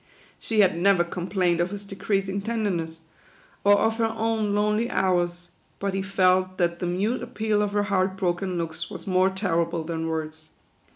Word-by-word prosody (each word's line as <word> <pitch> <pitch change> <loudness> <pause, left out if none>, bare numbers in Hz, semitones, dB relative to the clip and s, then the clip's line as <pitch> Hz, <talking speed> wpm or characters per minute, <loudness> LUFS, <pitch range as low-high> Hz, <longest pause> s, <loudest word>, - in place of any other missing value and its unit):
She 220 -2 +2
had 190 -4 +4
never 190 -1 +4
com 175 +1 -5
plained 180 -4 +1
of 175 - 0
his 205 +1 -7
decreasing 195 0 -2
tenderness, 190 -8 -2 0.6
or 205 0 +6
of 225 +2 +1
her 225 -1 +1
own 220 -2 0
lonely 210 +3 +1
hours; 175 -1 0 0.3
but 200 -1 -2
he 195 - -1
felt 185 -1 +2
that 170 -1 0
the 180 - -2
mute 200 +8 0
appeal 215 -1 -1
of 205 -1 -1
her 205 0 +2
heart 190 -1 0
broken 180 0 -1
looks 165 0 -4
was - - -8
more 185 0 +3
terrible 170 -4 -1
than 165 0 -3
words. 155 -1 -5
190 Hz, 175 wpm, -25 LUFS, 175-205 Hz, 0.6 s, or